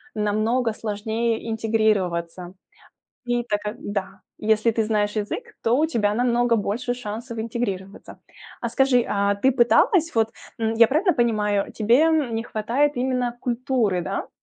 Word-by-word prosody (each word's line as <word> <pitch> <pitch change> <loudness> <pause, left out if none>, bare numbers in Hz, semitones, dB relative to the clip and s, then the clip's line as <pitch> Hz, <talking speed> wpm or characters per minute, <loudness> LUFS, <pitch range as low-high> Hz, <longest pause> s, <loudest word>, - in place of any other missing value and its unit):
намного 215 +3 0
сложнее 225 +2 -2
интегрироваться. 190 -6 -1 0.7
И 240 0 0
так 210 -3 -1
как 210 +2 -4
да, 195 -1 -5 0.2
если 220 +1 +2
ты 225 0 0
знаешь 210 -1 0
язык, 440 - -4
то 230 +2 +3
у 305 - +3
тебя 215 -10 0
намного 240 0 +2
больше 230 +4 -2
шансов 230 0 -7
интегрироваться. 205 -4 -5 0.4
А 235 - -2
скажи, 250 0 +3
а 200 0 +1
ты 260 +7 +2
пыталась 260 - +4
м, - - -20
вот 225 0 +2 0.3
я 225 0 +4
правильно 340 +6 +2
понимаю, 210 -4 0
тебе, 230 +6 +3
м, 310 -8 +1
не 225 - -2
хватает 245 +7 0
именно 250 -1 -1
культуры, 240 -6 0
да? 170 - -4
225 Hz, 145 wpm, -23 LUFS, 210-245 Hz, 0.7 s, пыталась